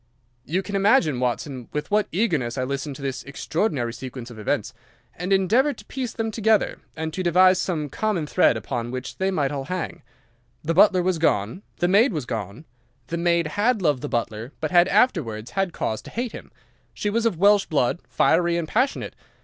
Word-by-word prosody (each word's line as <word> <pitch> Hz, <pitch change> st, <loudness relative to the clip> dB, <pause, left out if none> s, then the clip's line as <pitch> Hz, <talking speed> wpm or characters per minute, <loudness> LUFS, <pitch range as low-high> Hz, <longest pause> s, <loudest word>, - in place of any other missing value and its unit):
"You 185 Hz, +5 st, -1 dB
can 200 Hz, +2 st, -5 dB
imagine, 195 Hz, -, +3 dB
Watson, 125 Hz, 0 st, -2 dB
with 150 Hz, +6 st, -4 dB
what 210 Hz, 0 st, +2 dB
eagerness 160 Hz, -, 0 dB
I 130 Hz, -, 0 dB
listened 140 Hz, +2 st, -3 dB
to 140 Hz, -, -10 dB
this 135 Hz, -2 st, -3 dB
extraordinary 140 Hz, -, -2 dB
sequence 125 Hz, -1 st, -8 dB
of 110 Hz, -, -11 dB
events, 105 Hz, -, -1 dB, 0.4 s
and 180 Hz, +3 st, -5 dB
endeavoured 225 Hz, +10 st, +3 dB
to -, -, -13 dB
piece 255 Hz, -3 st, -4 dB
them 225 Hz, -1 st, -3 dB
together, 220 Hz, -1 st, +1 dB, 0.2 s
and 160 Hz, 0 st, -4 dB
to 185 Hz, -, -3 dB
devise 185 Hz, +1 st, +5 dB
some 160 Hz, -5 st, -2 dB
common 200 Hz, +1 st, -1 dB
thread -, -, +3 dB
upon 120 Hz, -2 st, -4 dB
which 130 Hz, +1 st, -6 dB
they 190 Hz, 0 st, +1 dB
might 145 Hz, -7 st, 0 dB
all 140 Hz, -2 st, -4 dB
hang. 180 Hz, +2 st, -4 dB, 0.6 s
The 165 Hz, +2 st, 0 dB
butler 185 Hz, 0 st, +5 dB
was 180 Hz, -2 st, 0 dB
gone. 115 Hz, -, +1 dB, 0.2 s
The 175 Hz, -, +1 dB
maid 210 Hz, +6 st, +4 dB
was 150 Hz, -6 st, -3 dB
gone. 110 Hz, -, -5 dB, 0.4 s
The 170 Hz, -, -2 dB
maid 170 Hz, 0 st, +2 dB
had 205 Hz, +6 st, +1 dB
loved 145 Hz, -6 st, +2 dB
the -, -, -4 dB
butler, 115 Hz, +2 st, -3 dB
but 155 Hz, -, -2 dB
had 175 Hz, 0 st, +6 dB
afterwards 155 Hz, -, +1 dB
had 195 Hz, -2 st, 0 dB
cause 110 Hz, -8 st, -3 dB
to -, -, -11 dB
hate 240 Hz, 0 st, -3 dB
him. -, -, -10 dB, 0.4 s
She 205 Hz, -, -1 dB
was 230 Hz, +2 st, +2 dB
of 200 Hz, -7 st, -2 dB
Welsh 200 Hz, +2 st, +4 dB
blood, 145 Hz, +1 st, +1 dB
fiery 170 Hz, +1 st, +2 dB
and 165 Hz, -2 st, -2 dB
passionate. 255 Hz, -, 0 dB
170 Hz, 195 wpm, -24 LUFS, 135-200 Hz, 0.6 s, had